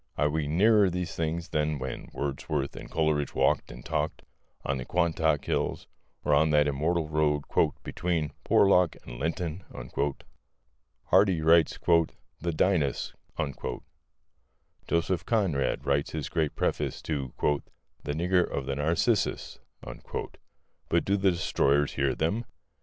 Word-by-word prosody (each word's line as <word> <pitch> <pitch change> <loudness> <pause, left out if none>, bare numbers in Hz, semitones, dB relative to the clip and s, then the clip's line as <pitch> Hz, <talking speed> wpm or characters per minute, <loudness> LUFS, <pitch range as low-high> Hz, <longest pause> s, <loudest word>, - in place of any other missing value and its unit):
Are 75 +2 +2
we 75 -1 -1
nearer 100 +5 +4
these 90 -1 -3
things 85 +1 -2
than 75 -1 0
when 65 -1 -6
Wordsworth 70 0 -3
and - - -9
Coleridge 75 -3 0
walked - - +2
and - - -11
talked - - -2 0.4
on 70 - 0
the - - -4
Quantock 80 -3 +1
Hills - - -1 0.4
or 75 - +3
on 80 +2 +4
that 75 -1 +4
immortal 80 +4 0
road 75 -1 +1 0.4
"between 85 -4 -1
Porlock 90 -4 +4
and - - -9
Linton"? 85 +3 -2 1.4
Hardy 95 -5 +4
writes 80 0 +4
"The 85 0 0
Dynasts," 80 -5 +1 1.7
Joseph 85 +2 0
Conrad 95 - +1
writes 70 0 0
his 75 -2 -3
great 80 -3 -1
preface - - -1
to 70 -5 -3 0.7
"The 75 - -2
Nigger 90 +3 +2
of 70 - -3
the 70 - -2
Narcissus," 85 +7 0 1.3
but 85 - +2
do 100 - +2
the 100 -1 +3
destroyers 75 -5 +1
hear 70 -1 +1
them? 100 +9 -1
80 Hz, 125 wpm, -28 LUFS, 75-85 Hz, 1.7 s, nearer